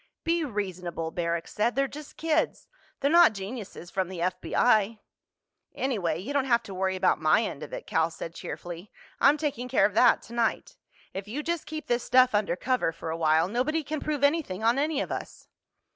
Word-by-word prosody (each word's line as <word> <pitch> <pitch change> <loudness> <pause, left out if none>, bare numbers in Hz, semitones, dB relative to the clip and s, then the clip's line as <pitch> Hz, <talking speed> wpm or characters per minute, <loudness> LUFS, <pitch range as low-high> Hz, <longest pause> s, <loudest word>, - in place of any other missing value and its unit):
"Be 335 0 +1
reasonable," 180 - -4
Barrack 170 0 -2
said. 225 +3 0
"They're 275 0 +2
just 295 +1 -10
kids. 320 0 0 0.3
They're 280 - +2
not 340 -7 +7
geniuses 195 -3 -7
from 190 -2 -1
the 185 -2 -6
F.B.I." 200 +5 +2 0.8
"Anyway, 195 - -1
you 215 +12 -5
don't 280 -2 +1
have 235 -2 +2
to 195 - -8
worry 190 0 0
about 185 - +2
my 155 +8 +4
end 175 - -5
of - - -8
it," - - -6
Cal 160 0 +1
said 165 0 -7
cheerfully. 175 +3 -7 0.3
"I'm 285 +2 +5
taking 275 -5 -3
care 260 - +4
of 205 - 0
that 245 +4 +5
tonight. 235 -1 -2 0.4
If 195 +1 -5
you 275 +8 -4
just 340 0 -2
keep 310 0 -5
this 240 0 0
stuff 255 -1 +5
undercover 205 +1 +1
for 165 0 -6
a - - -2
while, 160 0 +3
nobody 265 +9 0
can 305 +2 -3
prove 295 -2 -3
anything 285 - +1
on 235 +4 +3
any 295 0 0
of - - -4
us." - - -6
225 Hz, 190 wpm, -27 LUFS, 180-280 Hz, 0.8 s, not